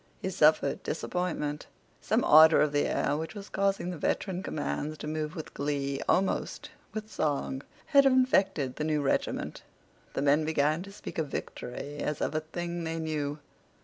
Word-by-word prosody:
He 190 Hz, -, -3 dB
suffered 155 Hz, -4 st, +3 dB
disappointment. 155 Hz, -3 st, -3 dB, 0.3 s
Some -, -, +1 dB
ardor 160 Hz, +1 st, +8 dB
of 150 Hz, -, +3 dB
the 145 Hz, 0 st, +2 dB
air 140 Hz, -, 0 dB
which 160 Hz, +7 st, -4 dB
was 200 Hz, -1 st, -8 dB
causing 195 Hz, -2 st, 0 dB
the 175 Hz, -, -7 dB
veteran 185 Hz, +3 st, -1 dB
commands 155 Hz, -3 st, -3 dB
to -, -, -6 dB
move 155 Hz, +2 st, -3 dB
with 160 Hz, -, -7 dB
glee—almost 140 Hz, +5 st, -1 dB, 0.2 s
with 215 Hz, 0 st, -6 dB
song—had 150 Hz, -, +1 dB
infected 195 Hz, -, +2 dB
the -, -, -2 dB
new 150 Hz, -1 st, 0 dB
regiment. 135 Hz, -, -1 dB, 0.5 s
The 135 Hz, -, -1 dB
men 145 Hz, +2 st, +4 dB
began 155 Hz, +1 st, +1 dB
to 200 Hz, +2 st, -9 dB
speak 200 Hz, -, -7 dB
of 155 Hz, -, 0 dB
victory 140 Hz, +2 st, -6 dB
as 150 Hz, 0 st, -2 dB
of -, -, -1 dB
a 155 Hz, -, +1 dB
thing 170 Hz, +2 st, -5 dB
they 165 Hz, 0 st, -3 dB
knew. 155 Hz, -2 st, -2 dB
155 Hz, 160 wpm, -29 LUFS, 145-180 Hz, 0.5 s, ardor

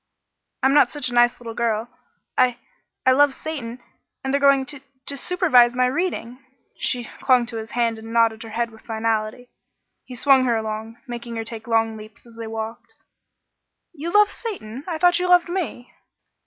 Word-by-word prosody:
"I'm 265 Hz, +1 st, +4 dB
not 290 Hz, -, +6 dB
such 295 Hz, -4 st, -3 dB
a -, -, -7 dB
nice 240 Hz, 0 st, +4 dB
little 230 Hz, -2 st, -7 dB
girl. 225 Hz, -1 st, -1 dB, 0.5 s
I 250 Hz, -1 st, +3 dB, 0.5 s
I 260 Hz, -, +6 dB
love 280 Hz, +1 st, +4 dB
Satan 250 Hz, -6 st, -6 dB, 0.4 s
and 265 Hz, 0 st, -2 dB
they're 280 Hz, -, +2 dB
going 275 Hz, -1 st, +5 dB
to 280 Hz, 0 st, -8 dB, 0.2 s
to 280 Hz, -, -3 dB
supervise 270 Hz, -8 st, +4 dB
my 250 Hz, 0 st, +3 dB
reading." 265 Hz, -4 st, -2 dB, 0.3 s
She 245 Hz, -2 st, -2 dB
clung 250 Hz, -2 st, +4 dB
to 235 Hz, -1 st, -6 dB
his 220 Hz, 0 st, -6 dB
hand 230 Hz, -2 st, +1 dB
and 225 Hz, +1 st, -9 dB
nodded 230 Hz, -1 st, +3 dB
her 225 Hz, -, -8 dB
head 230 Hz, +1 st, -2 dB
with 220 Hz, -, -16 dB
finality. 225 Hz, +1 st, -2 dB, 0.5 s
He 250 Hz, -, -10 dB
swung 265 Hz, +1 st, +4 dB
her 235 Hz, -2 st, +2 dB
along, 220 Hz, +1 st, -5 dB
making 240 Hz, -2 st, -6 dB
her 225 Hz, -, -3 dB
take 225 Hz, 0 st, -8 dB
long 225 Hz, -1 st, +1 dB
leaps 215 Hz, +1 st, -13 dB
as 235 Hz, -1 st, -16 dB
they 230 Hz, -1 st, -6 dB
walked. 225 Hz, +1 st, -6 dB, 1.0 s
"You 335 Hz, +2 st, -5 dB
love 415 Hz, +1 st, +5 dB
Satan? 275 Hz, -, -7 dB
I 335 Hz, -3 st, -2 dB
thought 355 Hz, +1 st, +4 dB
you 360 Hz, -, 0 dB
loved 355 Hz, -1 st, +5 dB
me!" 340 Hz, -9 st, -4 dB
240 Hz, 180 wpm, -23 LUFS, 225-280 Hz, 1.0 s, not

